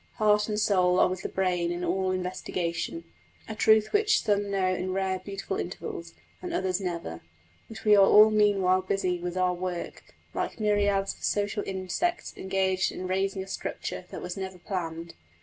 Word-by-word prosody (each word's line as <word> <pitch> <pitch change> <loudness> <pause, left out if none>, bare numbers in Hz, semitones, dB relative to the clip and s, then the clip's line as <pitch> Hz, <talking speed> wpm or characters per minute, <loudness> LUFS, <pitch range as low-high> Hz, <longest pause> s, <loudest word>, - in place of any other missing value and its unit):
Heart 210 -1 +2
and 210 0 -1
soul 185 -4 +3
are - - +6
with 185 -1 -4
the - - -4
brain 180 -2 0
in 175 +1 -3
all 185 +2 0
investigation 180 -2 -3 0.4
a 220 - -4
truth 220 0 +3
which 425 +1 +3
some 205 -1 +1
know 190 -2 +1
in 185 0 -2
rare, 190 -1 -1
beautiful 195 0 -5
intervals, 170 -1 -6 0.3
and 360 - -5
others 190 - -1
never; 170 - -4 0.5
but 220 -2 -10
we 210 -1 +7
are 200 - +7
all 215 +1 +8
meanwhile 195 -3 +3
busy 185 -1 -1
with 175 +1 -4
our 180 -1 +2
work, 180 -1 -6 0.2
like - - -3
myriads 205 -2 +1
of - - -17
social 205 +1 0
insects 195 - -2
engaged 190 0 0
in 185 - -6
raising 190 +1 -1
a - - -13
structure 190 -1 -5
that - - -7
was 180 0 -4
never 190 -1 -5
planned. 170 -3 -5
190 Hz, 175 wpm, -28 LUFS, 180-205 Hz, 0.5 s, all